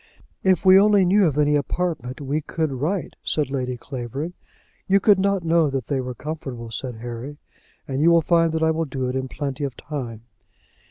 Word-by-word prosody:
"If 190 0 +2
we 190 +1 +8
only 205 -2 +5
knew 195 +1 +4
of 150 -2 -1
any 150 0 +3
apartments, 145 -3 -2
we 145 +3 -1
could 160 0 -2
write," 155 +8 -2
said 150 -3 -1
Lady 125 -2 -2
Clavering. 135 +6 -5 0.5
"You 195 +1 +4
could 200 -1 +4
not 195 -1 +1
know 165 -2 +3
that 135 -3 -3
they 135 +1 -1
were 125 -1 -5
comfortable," 135 -6 -6
said 125 +1 -4
Harry; 120 +5 -7 0.5
"and 135 +1 -2
you 165 - +5
will 170 -1 +5
find 165 0 +3
that 160 0 0
I 160 - +4
will 160 +1 -1
do 130 -2 -3
it 125 - -3
in 130 0 -2
plenty 140 +1 -4
of 135 -3 -4
time." 120 -7 -6
145 Hz, 200 wpm, -23 LUFS, 130-170 Hz, 0.5 s, we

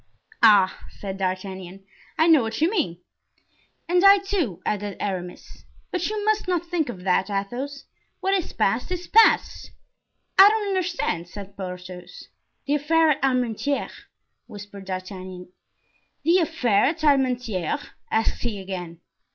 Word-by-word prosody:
"Ah!" 205 -5 +5
said 195 -1 -7
D'Artagnan; 185 0 -4 0.3
"I 320 - +4
know 320 -4 +6
what 225 -1 -4
you 325 +4 +2
mean." 230 - -1 0.9
"And 355 +1 +2
I, 395 0 +9
too," 375 - -2
added 205 -2 -2
Aramis; 180 -3 -6 0.3
"but 365 0 -1
you 425 -1 -3
must 430 -2 +1
not 350 -2 0
think 335 -5 -1
of 185 -6 -7
that, 190 +1 +1
Athos; 245 +8 -4 0.4
what 385 +1 0
is 380 -4 -1
past, 225 - 0
is 360 -1 -3
past." 450 +4 +4 0.7
"I 390 +1 +11
don't 425 -1 -1
understand," 350 - -1
said 200 +2 -10
Porthos. 180 -1 -9 0.4
"The 285 - 0
affair 315 +2 +3
at 280 - -1
Armentieres," 255 +1 -1 0.4
whispered 205 -1 -10
D'Artagnan. 185 -1 -7 0.7
"The 340 +4 +4
affair 260 - +2
at 310 +3 -1
Armentieres?" 255 - 0 0.2
asked 220 0 0
he 225 -4 -3
again. 180 -3 -7
235 Hz, 135 wpm, -24 LUFS, -, 0.9 s, I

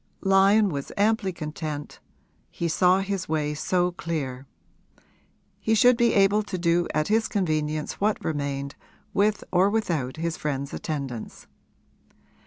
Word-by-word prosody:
Lyon 195 +2 +4
was 140 -4 -5
amply 210 -1 +2
content 155 -2 -6 0.5
he 170 - -3
saw 180 +3 +3
his 195 -2 -3
way 150 -1 0
so 180 +4 0
clear: 140 -7 -4 1.1
he 220 - +1
should 245 +3 +6
be 235 0 +2
able 200 +1 +4
to 205 -3 -5
do 170 0 +1
at 155 0 0
his 220 +1 +2
convenience 155 -5 -2
what 210 +1 0
remained, 140 -2 -3 0.4
with 210 +1 +1
or 185 +2 +4
without 165 -11 -1
his 165 0 -2
friend's 140 -2 -3
attendance. 135 -7 -5
170 Hz, 130 wpm, -25 LUFS, 150-200 Hz, 1.1 s, should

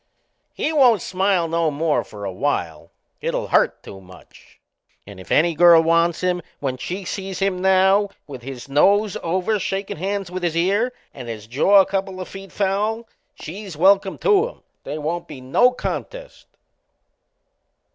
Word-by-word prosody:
He 315 - -1
won't 245 - +4
smile 185 -2 +1
no 165 0 0
more 150 +1 0
for 105 -1 -9
a 95 - -3
while 85 - -3 0.3
it'll - - -2
hurt - - +2
too 95 - -11
much. 95 -1 -18 0.5
And 100 -2 -12
if 95 - -12
any 170 +2 +3
girl 170 0 +6
wants 170 0 +2
him 180 -1 0 0.2
when 130 -2 -3
she 185 +8 -5
sees 190 0 -5
him 195 -2 -1
now 190 +2 +3 0.2
with 135 -4 -9
his 130 +1 -8
nose 200 +9 +3
over 185 +5 -1
shakin' 195 -1 -3
hands 195 +1 -3
with 185 0 -4
his 170 -2 -1
ear, 200 +8 +1 0.2
and 125 -3 -9
his 110 -2 -7
jaw 150 - +4
a - - +1
couple 195 -1 -3
o' 185 - -5
feet 195 +1 -11
foul 210 +4 -1 0.3
she's 190 0 -8
welcome 195 +3 +3
to 420 +1 +3
him. - - -14 0.2
They 145 - -4
won't 160 +3 -3
be 145 -4 -9
no 130 - +3
contest! - - -6
180 Hz, 165 wpm, -21 LUFS, 150-195 Hz, 0.5 s, girl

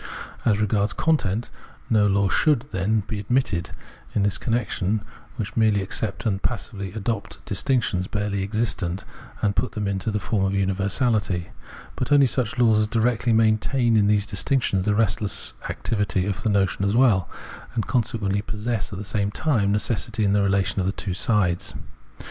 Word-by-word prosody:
As 105 -3 +3
regards 105 -1 +1
content, 120 -9 0 0.4
no 105 -2 +3
laws 100 -1 +2
should, 145 -5 +3
then, 105 +2 +1
be 105 +1 -5
admitted 100 -6 0 0.5
in 105 - +2
this 100 0 +1
connection, 110 -3 -1 0.3
which 110 -3 -5
merely 110 -3 +3
accept 110 +3 -3
and 100 -3 0
passively 100 -4 -3
adopt 110 0 -4
distinctions 100 -4 0
barely 105 -2 -2
existent, 100 -3 -2 0.4
and 100 -2 +2
put 130 - -1
them 105 -1 -2
into 95 +1 -1
the 105 -1 -1
form 100 0 -1
of 95 0 +1
universahty; 100 -1 0 0.5
but 125 - -3
only 145 -1 +7
such 125 -3 -1
laws 115 -3 +4
as 105 - +2
directly 115 +1 +1
maintain 115 +2 +3
in 105 -2 +4
these 105 -1 +2
distinctions 105 -3 0
the 105 - +3
restless 105 -1 0 0.2
activity 100 -4 -1
of 100 +1 -2
the 110 - 0
notion 100 -1 +1
as 100 +2 +1
well, 115 -9 +4 0.5
and 110 - 0
consequently 105 -5 0
possess 105 -1 -3
at 95 - -5
the 105 - -6
same 100 0 -1
time 105 -4 +1
necessity 105 +1 0
in 100 - +2
the 100 - +3
relation 100 0 +1
of 95 - 0
the - - +2
two 100 -1 -3
sides. 90 -2 +1
105 Hz, 165 wpm, -24 LUFS, 100-115 Hz, 0.5 s, only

